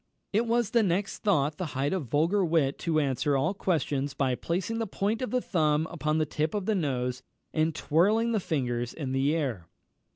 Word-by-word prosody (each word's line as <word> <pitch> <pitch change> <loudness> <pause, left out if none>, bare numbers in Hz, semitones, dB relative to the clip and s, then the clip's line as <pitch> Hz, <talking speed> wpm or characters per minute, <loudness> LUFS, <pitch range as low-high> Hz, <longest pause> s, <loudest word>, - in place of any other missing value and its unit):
It 225 +3 +2
was 235 -1 +1
next 200 -4 +1
thought 150 -8 +1
the 185 - -2
height 140 +4 +1
of 175 -9 -2
vulgar 165 - +2
wit 160 -5 +1
to 165 -3 +1
answer 140 0 +1
all 135 +8 +1
questions 145 -7 -1
by 130 -2 +1
placing 185 - -2
the 225 - -1
point 205 +4 -1
of 255 - -2
the 250 0 0
thumb 155 -5 +1
upon 155 -2 -1
the 155 - +2
tip 155 +4 -2
of 205 -3 -2
the 220 - +1
nose, 125 -8 -1 0.3
and 155 0 +1
twirling 215 +9 +2
the 220 - +2
fingers 120 -8 -2
in 140 -5 -4
the 135 +4 +2
air. 125 - -2
160 Hz, 195 wpm, -28 LUFS, 140-195 Hz, 0.3 s, It